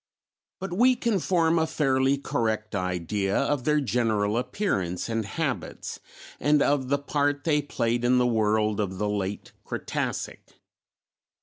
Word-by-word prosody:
But 190 Hz, -1 st, -5 dB
we 250 Hz, +7 st, +4 dB
can 230 Hz, -4 st, 0 dB
form 165 Hz, -2 st, +2 dB
a 160 Hz, -, +1 dB
fairly 135 Hz, -2 st, +2 dB
correct 110 Hz, -5 st, -2 dB
idea 90 Hz, +1 st, -1 dB
of 140 Hz, -2 st, 0 dB
their 150 Hz, 0 st, +3 dB
general 110 Hz, -6 st, +1 dB
appearance 100 Hz, -, -1 dB
and 115 Hz, -1 st, -1 dB
habits 140 Hz, +5 st, -4 dB, 0.4 s
and 150 Hz, +2 st, +3 dB
of 140 Hz, -3 st, +1 dB
the 140 Hz, +2 st, +2 dB
part 145 Hz, 0 st, 0 dB
they 150 Hz, -3 st, +2 dB
played 120 Hz, -4 st, -1 dB
in 125 Hz, +1 st, +4 dB
the 125 Hz, -, +3 dB
world 110 Hz, -2 st, +1 dB
of 95 Hz, -3 st, -2 dB
the 105 Hz, -, -1 dB
late 100 Hz, -1 st, -3 dB
Cretacic. -, -, -4 dB
125 Hz, 140 wpm, -26 LUFS, 105-150 Hz, 0.4 s, we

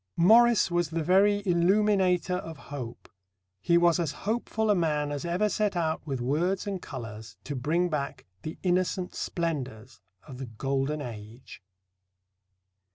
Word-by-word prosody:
Morris 225 Hz, +3 st, +5 dB
was 175 Hz, -2 st, +1 dB
the 165 Hz, 0 st, -2 dB
very 200 Hz, +4 st, +3 dB
illuminator 180 Hz, 0 st, +2 dB
of 165 Hz, -3 st, -7 dB, 0.2 s
hope. 120 Hz, -5 st, -7 dB, 0.5 s
He 170 Hz, -, +3 dB
was 170 Hz, 0 st, +4 dB
as 160 Hz, -4 st, -1 dB
hopeful 220 Hz, 0 st, 0 dB
a -, -, +4 dB
man 150 Hz, -4 st, 0 dB
as 145 Hz, +2 st, -4 dB
ever 180 Hz, +5 st, +1 dB
set 210 Hz, -1 st, 0 dB
out 160 Hz, -2 st, 0 dB
with 135 Hz, -3 st, -2 dB
words 170 Hz, +9 st, 0 dB
and 195 Hz, -3 st, -4 dB
colours 110 Hz, -6 st, -8 dB
to 145 Hz, -, -5 dB
bring 160 Hz, +7 st, +1 dB
back 150 Hz, -4 st, -4 dB, 0.2 s
the 155 Hz, -, -6 dB
innocent 180 Hz, 0 st, 0 dB
splendours 130 Hz, -8 st, -4 dB, 0.2 s
of 130 Hz, -4 st, -11 dB
the 135 Hz, -, -5 dB
Golden 135 Hz, +6 st, -2 dB
Age. 115 Hz, 0 st, -10 dB
170 Hz, 145 wpm, -28 LUFS, 135-185 Hz, 0.5 s, Morris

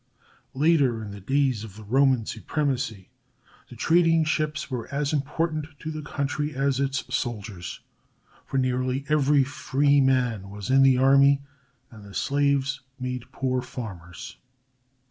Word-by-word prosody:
Later, 140 Hz, -6 st, +3 dB
in 105 Hz, -, -7 dB
the 100 Hz, -, -8 dB
days 130 Hz, 0 st, +1 dB
of 105 Hz, -4 st, -10 dB
the 110 Hz, -, -11 dB
Roman 130 Hz, +1 st, +3 dB
supremacy, 125 Hz, -, -3 dB, 0.6 s
the -, -, -11 dB
trading 165 Hz, -1 st, +3 dB
ships 155 Hz, -2 st, -1 dB
were 125 Hz, -1 st, -4 dB
as 140 Hz, +1 st, -1 dB
important 155 Hz, +2 st, -1 dB
to 155 Hz, -, -6 dB
the 155 Hz, 0 st, -5 dB
country 145 Hz, 0 st, -3 dB
as 135 Hz, 0 st, +1 dB
its 140 Hz, 0 st, 0 dB
soldiers, 105 Hz, -7 st, -4 dB, 0.6 s
for 135 Hz, -, -4 dB
nearly 130 Hz, +1 st, 0 dB
every 145 Hz, -2 st, +4 dB
free 140 Hz, +1 st, +2 dB
man 125 Hz, -7 st, +1 dB
was 105 Hz, +4 st, -5 dB
in 135 Hz, 0 st, +6 dB
the 135 Hz, -1 st, +5 dB
army, 140 Hz, +1 st, +5 dB, 0.5 s
and 110 Hz, -3 st, -13 dB
the 100 Hz, -1 st, -12 dB
slaves 140 Hz, -1 st, +1 dB, 0.2 s
made 125 Hz, -1 st, -5 dB
poor 130 Hz, -1 st, -1 dB
farmers. 95 Hz, -, -8 dB
135 Hz, 140 wpm, -25 LUFS, 120-145 Hz, 0.6 s, in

